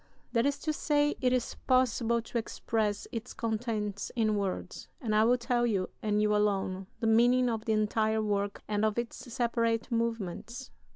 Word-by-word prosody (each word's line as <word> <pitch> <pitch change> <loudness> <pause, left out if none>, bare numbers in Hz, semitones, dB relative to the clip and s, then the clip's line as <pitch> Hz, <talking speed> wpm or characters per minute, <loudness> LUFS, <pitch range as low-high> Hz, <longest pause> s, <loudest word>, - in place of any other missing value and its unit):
That 235 +2 +2
is 285 0 0
to 310 - -1
say, 295 -1 +2
it 250 -1 +3
is 250 -1 0
possible 235 -2 +2
to 235 - -2
express 215 -2 -2
its 230 +1 -6
contents 215 -3 -2
in 220 -3 +2
words, 200 -2 -3
and 225 -5 -2
I 215 +1 +5
will 245 +2 +4
tell 240 0 +1
you, 195 -5 -1
and 210 -1 +1
you 210 0 +3
alone, 195 -2 0
the - - 0
meaning 240 +2 +4
of 225 -1 -3
the 220 - +1
entire 215 +1 +1
work 205 -1 -1
and 210 0 0
of 215 0 +1
its 235 -1 -3
separate 230 -2 0
movements. 230 +2 -3
225 Hz, 175 wpm, -30 LUFS, 210-240 Hz, -, I